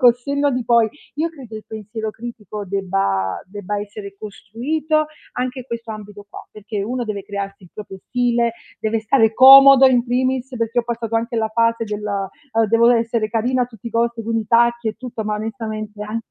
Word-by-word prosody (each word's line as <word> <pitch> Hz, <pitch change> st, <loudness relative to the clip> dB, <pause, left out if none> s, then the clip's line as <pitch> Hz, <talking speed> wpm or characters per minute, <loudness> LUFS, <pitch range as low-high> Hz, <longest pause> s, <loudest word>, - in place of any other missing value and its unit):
col 245 Hz, -2 st, +7 dB
senno 280 Hz, +3 st, -1 dB
di 250 Hz, -2 st, -2 dB
poi 230 Hz, -1 st, +4 dB, 0.3 s
io 320 Hz, +3 st, 0 dB
credo 260 Hz, -8 st, -12 dB
il 215 Hz, -, -9 dB
pensiero 220 Hz, 0 st, -5 dB
critico 215 Hz, -3 st, -8 dB
debba 180 Hz, -, -1 dB
debba 205 Hz, +1 st, -5 dB
essere 205 Hz, -1 st, -8 dB
costruito 295 Hz, +10 st, -2 dB, 0.3 s
anche 255 Hz, +1 st, -3 dB
in -, -, -10 dB
questo 230 Hz, -2 st, -6 dB
ambito 210 Hz, -1 st, -9 dB
qua, -, -, -9 dB
perché 210 Hz, -1 st, -5 dB
uno 245 Hz, +4 st, -3 dB
deve 210 Hz, -3 st, -4 dB
crearsi 200 Hz, -1 st, -6 dB
il 175 Hz, -, -17 dB
proprio 195 Hz, -2 st, -9 dB
stile, 240 Hz, -2 st, +1 dB, 0.3 s
deve 220 Hz, +1 st, -1 dB
stare 220 Hz, 0 st, +3 dB
comodo 270 Hz, 0 st, +9 dB
in 250 Hz, -2 st, +3 dB
primis, 255 Hz, +1 st, 0 dB
perché 230 Hz, +1 st, -1 dB
ho -, -, -11 dB
passato 230 Hz, -1 st, -4 dB
anche 235 Hz, +1 st, -2 dB
la 220 Hz, -1 st, 0 dB
fase 230 Hz, +1 st, +1 dB
della, 205 Hz, -2 st, -3 dB, 0.2 s
ehm, 225 Hz, -1 st, +3 dB
"dovevo 230 Hz, +2 st, +5 dB
essere 230 Hz, -2 st, 0 dB
carina 245 Hz, +3 st, 0 dB
a -, -, +2 dB
tutti 230 Hz, -2 st, -13 dB
i -, -, -15 dB
costi" 230 Hz, 0 st, 0 dB
con 225 Hz, +1 st, -2 dB
i 220 Hz, -, -2 dB
tacchi 235 Hz, 0 st, +3 dB
e -, -, -1 dB
tutto, 230 Hz, -2 st, -6 dB
ma 210 Hz, -, -1 dB
onestamente 215 Hz, -1 st, -5 dB
a 215 Hz, +2 st, -4 dB
225 Hz, 195 wpm, -20 LUFS, 210-245 Hz, 0.3 s, comodo